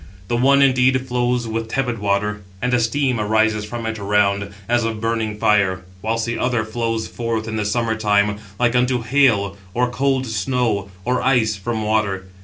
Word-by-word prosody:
The 120 - +1
one, 140 +3 +4
indeed, 130 -1 +3
flows 125 -1 0
with 115 0 -3
tepid 120 -1 -2
water, 105 +1 -1 0.2
and 125 +3 -1
a 125 - +4
steam 125 +1 0
arises 110 0 +1
from 115 +2 -6
it 110 -1 -3
around, 100 0 +1 0.2
as 120 0 +2
of 115 -1 -2
burning 115 -1 -1
fire; 95 -3 +2 0.2
whilst 115 +2 -1
the 120 0 -3
other 120 -3 0
flows 115 0 -2
forth 115 -2 -3
in 110 - -4
the 105 -1 -1
summer 115 +1 0
time, 105 -1 +1 0.2
like 120 0 +2
unto 125 -1 +2
hail, 115 -6 +2 0.2
or 125 0 +1
cold 135 0 0
snow, 115 -4 -1 0.2
or 125 +1 +1
ice 120 -5 +2
from 110 +2 -3
water. 105 -3 0
115 Hz, 180 wpm, -20 LUFS, 105-125 Hz, 0.2 s, one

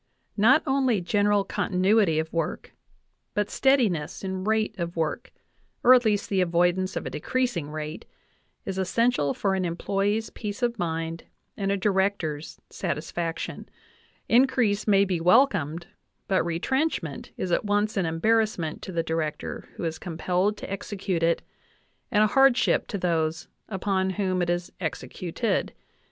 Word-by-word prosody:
Not 250 +9 +5
only 265 -6 +2
general 205 +3 +2
continuity 195 -3 +2
of 160 0 -2
work, 165 -2 -3 0.6
but 210 0 0
steadi 265 -3 +4
ness 165 -2 -4
in 190 -1 -3
rate 220 0 +1
of 170 0 -3
work 165 +8 -2 0.5
or 255 - +8
at 250 -2 +5
least 205 -2 +1
the 195 -2 +1
avoidance 180 +2 +1
of - - -3
a - - -4
decreasing 200 - -1
rate 155 0 -6 0.6
is 190 -1 -3
essential 190 - +1
for 195 -1 0
an 190 -1 0
employee's 200 +5 -1
peace 210 +3 -6
of 235 -2 0
mind 165 -1 -3 0.3
and 195 -1 -1
a 200 - +1
Di 195 +2 +1
rector's 190 -6 -1
satisfaction; 165 +3 -4 0.6
increase 235 -4 +3
may 200 -1 +5
be 180 -3 -1
welcomed, 175 - +3 0.4
but 190 -1 +2
retrench 265 - 0
ment 150 -4 -7
is 185 - -3
at - - +2
once 205 +1 +1
an 190 -4 +1
embarrassment 175 -1 0
to 190 - -7
the 170 -2 -1
Director 160 -2 -3
who - - -6
is 160 -1 -3
com 170 -3 -6
pelled 185 +5 +1
to - - -8
execute 195 -3 -3
it, 165 0 +2 0.7
and 210 0 +4
a - - +6
hardship 270 +3 +4
to 200 - -3
those 165 -3 -1 0.2
upon 190 -1 0
whom 185 -1 -1
it 175 - 0
is 175 0 -1
executed. 185 +4 -2
190 Hz, 155 wpm, -26 LUFS, 170-210 Hz, 0.7 s, or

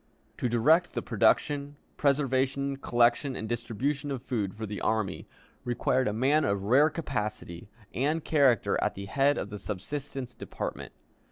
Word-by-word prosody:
To 125 - -1
direct 155 +10 +3
the - - -2
production, 140 +6 +1 0.2
preservation, 140 -1 +1
collection, 120 +2 +2
and 110 - -4
distribution 120 +5 -2
of 135 -3 -4
food 100 -6 -2
for 110 +1 -5
the 105 -1 -6
army 110 -4 -1 0.4
required 125 +1 +1
a - - +1
man 135 +8 +2
of 100 -1 0
rare 135 +9 +5
capacity 105 - -4 0.2
and 150 +5 0
character 140 -6 +3
at - - 0
the 100 - -6
head 140 +8 +2
of 100 - -4
the 105 - -6
subsistence 130 +7 -5
department. - - -6
125 Hz, 150 wpm, -28 LUFS, 110-140 Hz, 0.4 s, rare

